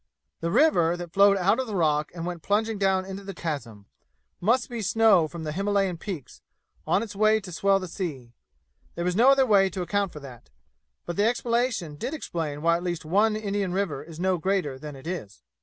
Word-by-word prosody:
The 165 Hz, -, -2 dB
river, 175 Hz, -, +3 dB
that 175 Hz, -1 st, -8 dB
flowed 200 Hz, 0 st, +5 dB
out 195 Hz, +6 st, +2 dB
of 260 Hz, -3 st, -2 dB
rock 155 Hz, -6 st, +1 dB
and 170 Hz, -1 st, -5 dB
went 175 Hz, -1 st, -5 dB
plunging 215 Hz, +3 st, 0 dB
down 190 Hz, -1 st, +2 dB
into 195 Hz, +1 st, -7 dB
the 195 Hz, -1 st, -7 dB
chasm, 120 Hz, -12 st, -5 dB, 0.5 s
must 235 Hz, +6 st, +2 dB
be 240 Hz, -3 st, -5 dB
snow 210 Hz, -5 st, +4 dB
from 165 Hz, +1 st, -8 dB
the 155 Hz, -, -3 dB
Himalayan 195 Hz, 0 st, 0 dB
peaks, 175 Hz, -, -7 dB, 0.5 s
on 200 Hz, -, +2 dB
its 210 Hz, -3 st, -8 dB
way 215 Hz, +1 st, +4 dB
to 190 Hz, -3 st, -10 dB
swell 195 Hz, +3 st, +2 dB
the 185 Hz, -, -6 dB
sea. 145 Hz, -, -6 dB, 0.6 s
There 170 Hz, -, -3 dB
was 180 Hz, 0 st, 0 dB
no 240 Hz, +6 st, +6 dB
other 275 Hz, -1 st, +5 dB
way 200 Hz, -4 st, +4 dB
to 185 Hz, 0 st, -4 dB
account 200 Hz, +1 st, -1 dB
for 150 Hz, -, -9 dB
that; 125 Hz, -, -12 dB, 0.6 s
but 175 Hz, -, -5 dB
that 210 Hz, +2 st, +4 dB
explanation 235 Hz, -, -1 dB
did 270 Hz, -, -4 dB
explain 160 Hz, -, -4 dB
why 170 Hz, 0 st, +4 dB
at 175 Hz, -, -7 dB
least 175 Hz, -3 st, -3 dB
one 210 Hz, +6 st, +2 dB
Indian 200 Hz, -3 st, -2 dB
river 185 Hz, -8 st, -1 dB
is 160 Hz, +1 st, -11 dB
no 185 Hz, -1 st, +1 dB
greater 180 Hz, -7 st, -1 dB
than 150 Hz, 0 st, -8 dB
it 135 Hz, +2 st, -13 dB
is. 170 Hz, -, -6 dB
185 Hz, 205 wpm, -26 LUFS, 165-205 Hz, 0.6 s, no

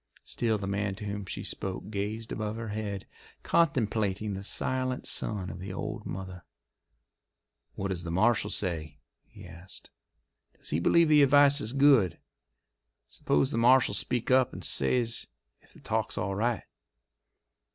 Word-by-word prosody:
Still 115 Hz, -2 st, -1 dB
the 100 Hz, -, -5 dB
man 100 Hz, 0 st, -2 dB
to 105 Hz, +1 st, -8 dB
whom 100 Hz, -1 st, -5 dB
she -, -, -5 dB
spoke 95 Hz, +2 st, -4 dB
gazed 110 Hz, +2 st, -4 dB
above 110 Hz, 0 st, -3 dB
her 115 Hz, -1 st, -5 dB
head, 105 Hz, -2 st, -4 dB, 0.4 s
contemplating 110 Hz, -, +1 dB
the 95 Hz, 0 st, -6 dB
silent 130 Hz, +4 st, -1 dB
son 100 Hz, -4 st, -1 dB
of -, -, -9 dB
the 95 Hz, +1 st, -6 dB
old 95 Hz, -, -5 dB
mother. 95 Hz, -1 st, -7 dB, 1.3 s
"What 100 Hz, -, -3 dB
does 90 Hz, -3 st, -3 dB
the 85 Hz, -, -5 dB
marshal 105 Hz, +4 st, +2 dB
say?" 80 Hz, -8 st, -2 dB, 0.3 s
he -, -, -14 dB
asked. 90 Hz, +2 st, -13 dB, 0.7 s
"Does -, -, -7 dB
he 75 Hz, -, +1 dB
believe 170 Hz, -, +4 dB
the 150 Hz, -1 st, +6 dB
advice 145 Hz, +1 st, +5 dB
is 110 Hz, -, -3 dB
good? 135 Hz, -, +4 dB, 0.9 s
Suppose 70 Hz, -, 0 dB
the 115 Hz, -, 0 dB
marshal 125 Hz, +2 st, +5 dB
speaks 125 Hz, 0 st, -1 dB
up 130 Hz, -1 st, +4 dB
and -, -, -8 dB
says 115 Hz, -, 0 dB, 0.3 s
if -, -, -25 dB
the -, -, -17 dB
talk's -, -, -2 dB
all 100 Hz, +1 st, -1 dB
right?" 115 Hz, +3 st, -1 dB
105 Hz, 150 wpm, -29 LUFS, 95-120 Hz, 1.3 s, the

